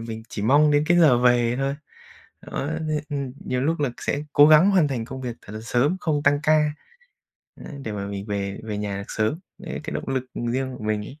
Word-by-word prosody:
mình 115 Hz, -1 st, -6 dB
chỉ 100 Hz, -, -5 dB
mong 145 Hz, +6 st, +5 dB
đến 145 Hz, 0 st, +3 dB
cái 175 Hz, 0 st, +5 dB
giờ 150 Hz, -8 st, +6 dB
về 120 Hz, -1 st, +3 dB
thôi. 135 Hz, +1 st, -1 dB, 0.7 s
Đó, 140 Hz, -, -4 dB, 0.2 s
thế 150 Hz, -1 st, 0 dB
ừm, 140 Hz, -3 st, -3 dB
nhiều 125 Hz, 0 st, -1 dB
lúc 160 Hz, +4 st, 0 dB
là 145 Hz, -3 st, +1 dB
sẽ 145 Hz, -, -2 dB
cố 145 Hz, +1 st, +8 dB
gắng 155 Hz, +6 st, +7 dB
hoàn 185 Hz, -6 st, +4 dB
thành 125 Hz, -5 st, -3 dB
công 130 Hz, +2 st, -7 dB
việc 120 Hz, -3 st, -4 dB
thật 105 Hz, -, -11 dB
là 110 Hz, -, -5 dB
sớm, 125 Hz, +9 st, +1 dB
không 150 Hz, -4 st, -1 dB
tăng 145 Hz, 0 st, +3 dB
ca, 150 Hz, -1 st, +3 dB, 0.9 s
đấy, -, -, -10 dB
để 110 Hz, -, -4 dB
mà 100 Hz, -1 st, -4 dB
mình 100 Hz, 0 st, -6 dB
về 100 Hz, -1 st, -3 dB
về 105 Hz, -2 st, -4 dB
nhà 105 Hz, -1 st, -3 dB
được 100 Hz, -, -6 dB
sớm, 110 Hz, +10 st, -1 dB, 0.2 s
đấy, 185 Hz, -4 st, -6 dB
cái -, -, -5 dB
động -, -, -4 dB
lực 130 Hz, -1 st, -1 dB, 0.3 s
riêng 130 Hz, 0 st, -2 dB
của 110 Hz, -, -8 dB
mình 105 Hz, -1 st, -1 dB
ấy. 145 Hz, +6 st, -12 dB
130 Hz, 235 wpm, -24 LUFS, 110-150 Hz, 0.9 s, cố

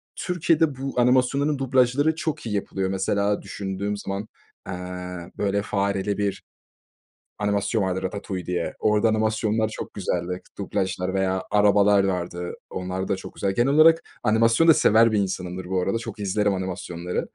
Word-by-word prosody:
Türkiye'de 165 Hz, -5 st, +1 dB
bu 135 Hz, -2 st, -3 dB
animasyonların 130 Hz, +4 st, +3 dB
dublajları 135 Hz, +4 st, +2 dB
çok 155 Hz, -4 st, -3 dB
iyi 105 Hz, -2 st, -2 dB
yapılıyor. 95 Hz, -1 st, -2 dB
Mesela, 100 Hz, +2 st, 0 dB
düşündüğüm 100 Hz, +1 st, -4 dB
zaman, 100 Hz, +2 st, -4 dB, 0.4 s
eee, 95 Hz, -, -4 dB, 0.6 s
böyle, 100 Hz, 0 st, 0 dB
fareli 100 Hz, 0 st, -1 dB
bir 100 Hz, -1 st, -2 dB, 1.0 s
animasyon 105 Hz, +1 st, 0 dB
var, 95 Hz, 0 st, -1 dB
Ratatouille 95 Hz, -1 st, -4 dB
diye. 90 Hz, -2 st, -2 dB
Orada 105 Hz, +1 st, +3 dB
animasyonlar 110 Hz, 0 st, +1 dB
çok -, -, -7 dB
güzeldi, 90 Hz, -2 st, -2 dB, 0.2 s
dublajlar 95 Hz, -1 st, -2 dB
veya 95 Hz, -1 st, 0 dB
Arabalar 105 Hz, -1 st, +5 dB
vardı. 90 Hz, -2 st, -2 dB, 0.2 s
Onlar 95 Hz, +1 st, -4 dB
da 100 Hz, -, +1 dB
çok -, -, -9 dB
güzel. 100 Hz, -1 st, 0 dB
Genel 130 Hz, +4 st, +2 dB
olarak 165 Hz, +2 st, +6 dB, 0.2 s
animasyon 115 Hz, +7 st, +3 dB
da -, -, +10 dB
sever 115 Hz, -2 st, +5 dB
bir 105 Hz, -, +1 dB
insanımdır 90 Hz, -1 st, -3 dB
bu 95 Hz, 0 st, -1 dB
arada, 95 Hz, +5 st, 0 dB
çok 115 Hz, -2 st, -7 dB
izlerim 100 Hz, 0 st, +1 dB
animasyonları. 90 Hz, -2 st, -3 dB
100 Hz, 145 wpm, -24 LUFS, 95-115 Hz, 1.0 s, da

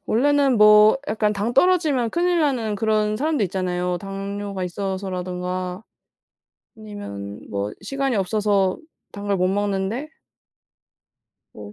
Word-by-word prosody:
원래는 275 Hz, +1 st, +3 dB
뭐 210 Hz, +3 st, +7 dB
약간 215 Hz, -1 st, +1 dB
당 210 Hz, +4 st, -2 dB
떨어지면 295 Hz, -8 st, +3 dB
큰일 350 Hz, 0 st, +1 dB
나는 240 Hz, -8 st, 0 dB
그런 215 Hz, 0 st, +1 dB
사람도 295 Hz, -5 st, 0 dB
있잖아요. 180 Hz, -1 st, -2 dB
당뇨가 195 Hz, 0 st, -5 dB
있어서라든가 185 Hz, 0 st, -4 dB, 0.9 s
아니면 155 Hz, -, -8 dB
뭐 100 Hz, +1 st, -3 dB
시간이 270 Hz, +2 st, -1 dB
없어서 200 Hz, -1 st, +1 dB, 0.3 s
당을 200 Hz, -1 st, -2 dB
못 185 Hz, 0 st, +1 dB
먹는데 205 Hz, +7 st, -1 dB, 1.4 s
뭐 105 Hz, -1 st, -10 dB
205 Hz, 255 characters per minute, -22 LUFS, 185-230 Hz, 1.4 s, 뭐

